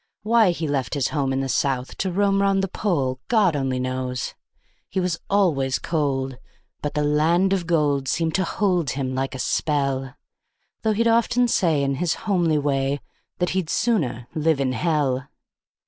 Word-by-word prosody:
Why 225 -2 +4
he 165 -2 -2
left 140 -3 -1
his 140 -3 0
home 140 -3 -1
in 135 0 0
the 135 - -2
South 130 -1 -1
to 190 - -1
roam 195 +1 +2
'round 195 -1 +2
the - - 0
Pole, 140 -10 -1
God 210 -8 +3
only 135 -2 -1
knows. 130 -1 -3 0.6
He 190 - -2
was 180 -2 -1
always 155 -10 +2
cold, 135 -5 -2 0.4
but 150 - -3
the 150 - +1
land 165 +6 +3
of 180 -4 -1
gold 145 -5 +1
seemed 160 +3 0
to 190 - +2
hold 180 -8 0
him 130 0 -2
like 135 +1 -2
a - - -4
spell; 135 -2 -1 0.7
Though 220 -1 +1
he'd 230 +2 +1
often 240 +2 +3
say 165 -10 +2
in 135 -1 0
his 175 -2 +1
homely 175 -6 +2
way 140 -1 0 0.4
that 180 - 0
he'd 185 -4 -1
"sooner 140 - 0
live 155 -1 +1
in 135 -2 +1
hell". 135 -1 0
150 Hz, 175 wpm, -23 LUFS, 135-185 Hz, 0.7 s, Why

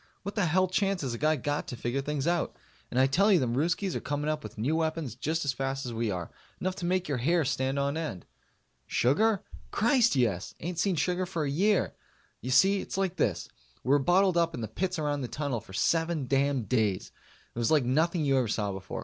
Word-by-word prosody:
What 200 +2 -4
the 205 -5 +1
hell 185 +3 +3
chance 195 -1 0
has 130 -3 -2
a 115 - -5
guy 155 +1 +3
got 145 +1 -2
to - - -5
figure 120 +3 -2
things 145 0 -2
out? 170 0 0 0.3
And 125 - 0
I 130 - +6
tell 195 +11 +3
you 190 - +6
them 120 -5 0
Ruskies 175 +6 0
are - - -2
coming 145 +1 -1
up 155 0 -3
with - - -10
new 130 +9 0
weapons 160 -6 -1
just 155 +6 -2
as 140 - +1
fast 135 +1 -3
as 120 - -4
we 115 0 -1
are. 90 -3 -4 0.3
Enough 185 0 -1
to 175 - -3
make 185 0 0
your 140 -4 -1
hair 165 +5 +2
stand 130 +1 -1
on 140 +1 0
end. 155 - -4 0.6
Sugar? 195 - +2 0.3
Christ, 235 +1 +3
yes! 110 -8 0
Ain't 170 0 -4
seen 190 0 +2
sugar 180 +3 0
for 170 -4 -2
a 145 - -1
year. 195 +7 +2 0.5
You 125 - -5
see, 190 +9 +4
it's - - -6
like 190 -2 -1
this: 90 -6 0 0.4
we - - -4
were 145 +1 +5
bottled 180 +5 +3
up 165 -1 +2
in - - -5
the 110 - -3
pits 180 - -2
around 145 -2 -1
the 125 - -3
Tunnel 140 -4 -3
for 105 - -15
seven 165 - +1
damn 135 0 +1
days. 110 -5 0 0.4
It - - -5
was 115 - +1
like 150 -5 +3
nothing 160 +5 +1
you 135 -1 +3
ever 125 - 0
saw 105 -1 -1
before. 95 -1 -6
145 Hz, 235 wpm, -29 LUFS, 125-175 Hz, 0.6 s, I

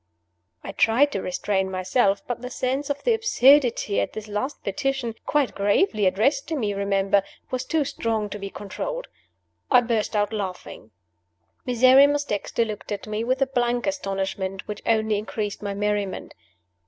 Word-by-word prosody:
I - - -6
tried 235 +8 +3
to 195 - -2
restrain 190 +1 -1
myself; 195 +2 +1
but 245 -1 -4
the 250 - -5
sense 260 +3 -2
of 285 0 -3
the 480 - +3
absurdity 280 - +4
of - - -1
this 215 0 -7
last 210 +7 -4
petition 270 -5 -2
(quite 290 -4 +1
gravely 205 - +2
addressed 270 +10 +1
to 320 - -2
me, 215 -8 -1
remember!) 200 0 +2 0.3
was 255 0 -2
too 315 -3 0
strong 225 -4 -2
to 210 - -5
be 195 0 -5
controlled. - - -5 0.6
I 250 -2 +6
burst 230 -3 -1
out 205 +1 +1
laughing. 185 - -6 0.8
Miserrimus 265 +4 +5
Dexter 230 -1 -1
looked 215 -1 -7
at 200 -1 -4
me 215 +1 -3
with 255 +3 +1
a - - +1
blank 245 -2 0
astonishment 195 -7 -3
which 210 -1 -6
only 220 -2 +2
increased 210 0 -4
my 200 -1 -4
merriment. 205 -1 -2
220 Hz, 160 wpm, -24 LUFS, 200-265 Hz, 0.8 s, I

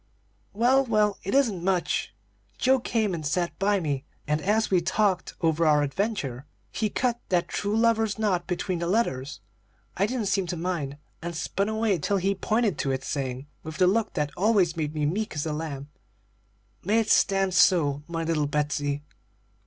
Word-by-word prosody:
"Well, 250 +6 +3
well, 215 -5 +1
it 195 - -2
isn't 220 -11 +2
much. 180 -9 0 0.4
Joe 265 +1 +3
came 220 -5 0
and 165 -2 -4
sat 170 +4 -1
by 200 +1 +2
me, 145 -5 -2 0.2
and, 150 +1 0
as 215 +4 +1
we 180 -2 +4
talked 190 +1 0
over 165 -1 +2
our 150 -2 +4
adventure, 145 - -2 0.2
he 215 - -1
cut 240 +2 0
that 175 -2 +1
true 205 +2 -1
lover's 225 -2 +2
knot 195 -5 0
between 180 0 -2
the 170 - -2
letters. 145 - -1 0.5
I 195 +3 +1
didn't 240 -2 -2
seem 195 -2 0
to 175 - -3
mind, 160 -5 -3 0.2
and 170 +1 -5
spun 200 +5 -1
away 220 -4 +1
till 200 +7 0
he 195 +1 +1
pointed 215 -2 0
to 140 - -1
it, 130 -1 -1
saying, 130 -1 -3 0.2
with 160 0 -8
the 185 - +4
look 215 +4 +1
that 145 -1 -1
always 190 -4 +2
made 155 -2 -3
me 150 -1 0
meek 195 +5 -2
as 145 - -2
a 155 - -2
lamb, 145 -3 -5 0.9
'May 215 +5 +3
it 220 - -1
stand 195 -1 +3
so, 150 -6 +4
my 165 -1 -3
little 160 -3 0
Betsey?' 145 0 -1
180 Hz, 180 wpm, -26 LUFS, 150-210 Hz, 0.9 s, we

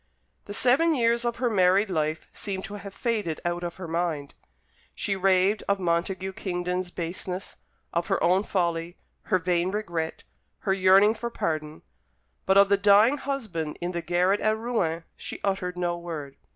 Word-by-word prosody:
The 205 - -7
seven 275 +8 +4
years 235 -1 +2
of 235 -1 0
her 250 - 0
married 190 +1 +3
life 155 -1 -1
seemed 195 -2 -5
to 200 - -8
have 200 -1 -7
faded 210 -7 -2
out 175 0 -1
of 170 -1 -4
her 185 -2 -7
mind. 165 -4 -2 0.6
She 200 - -1
raved 190 +2 +3
of 200 0 +1
Montague 185 +2 -1
Kingdon's 180 -1 -3
baseness, 180 +2 -5 0.4
of 170 0 0
her - - +2
own 185 +2 +4
folly, 170 -3 -1 0.3
her 185 - +2
vain 175 0 0
regret, 170 -6 -3 0.4
her 190 - +1
yearning 195 +2 +5
for 235 +1 -4
pardon; 155 -7 -3 0.6
but 190 +1 +5
of 200 0 +7
the 200 - +4
dying 205 +7 +5
husband 210 - -3
in 175 +1 -2
the 170 -1 -3
garret 180 +4 +2
at 215 0 +1
Rouen 200 -9 -1
she - - -7
uttered 185 -2 -1
no 175 -1 0
word. 155 -5 -6
185 Hz, 165 wpm, -26 LUFS, 170-205 Hz, 0.6 s, of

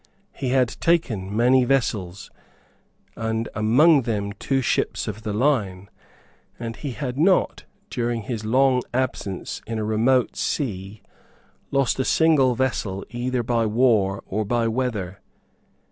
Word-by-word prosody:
He 135 -2 -3
had 130 -1 +3
taken 110 - 0
many 125 +2 +4
vessels, 105 -8 -1 0.8
and 110 0 -2
among 135 +8 +4
them 105 -4 -2
two 135 +5 -1
ships 130 - -1
of 110 +1 -5
the 110 - -4
line; 105 -6 0 0.7
and 115 -1 -5
he 140 0 -5
had 130 0 -4
not, 185 +3 +2 0.3
during 120 -2 -2
his 110 -1 -4
long 130 +3 +3
absence 115 -7 -3
in 115 0 -3
a 110 - -2
remote 115 +4 +2
sea, 100 - -3 0.7
lost 135 -1 +1
a - - +2
single 140 -5 +3
vessel 110 -7 -2
either 125 0 -2
by 115 -1 +1
war 105 -4 +2
or 110 +3 -2
by 115 +2 0
weather. 110 -6 -2
115 Hz, 130 wpm, -23 LUFS, 105-130 Hz, 0.8 s, many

